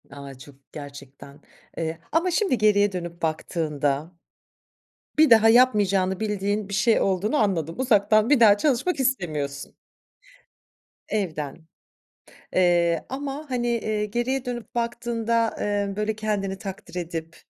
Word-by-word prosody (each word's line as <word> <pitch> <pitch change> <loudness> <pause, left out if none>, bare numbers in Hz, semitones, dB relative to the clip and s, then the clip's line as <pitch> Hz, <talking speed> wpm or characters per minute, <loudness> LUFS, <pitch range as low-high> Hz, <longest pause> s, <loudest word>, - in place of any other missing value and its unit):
A, 140 -1 -10
çok, 135 +2 -14 0.2
gerçekten, 140 -1 -11 0.4
eee, 160 0 -3
ama 335 +4 +1
şimdi 350 - +1
geriye 205 -1 +3
dönüp 175 -1 -6
baktığında 155 -2 -2 1.1
bir 310 -3 +6
daha 225 -1 +7
yapmayacağını 205 -6 +3
bildiğin 205 -1 -2
bir 200 - -5
şey 215 +3 +3
olduğunu 195 +7 0
anladım. 170 - 0
Uzaktan 215 -2 +3
bir 290 -4 +4
daha 210 -3 +7
çalışmak 285 - 0
istemiyorsun. 155 - -2 1.4
Evden. 160 -6 -4 0.9
Eee, 175 -2 +2
ama 280 +3 -5
hani, 240 -1 -1
eee, 215 -3 -1
geriye 240 +5 -2
dönüp 240 -3 -6
baktığında, 235 -1 -1
eee, 205 -1 -1
böyle 210 +1 -1
kendini 205 -3 -2
takdir 195 -3 -8
edip, 165 -2 -5
205 Hz, 120 wpm, -24 LUFS, 170-235 Hz, 1.4 s, daha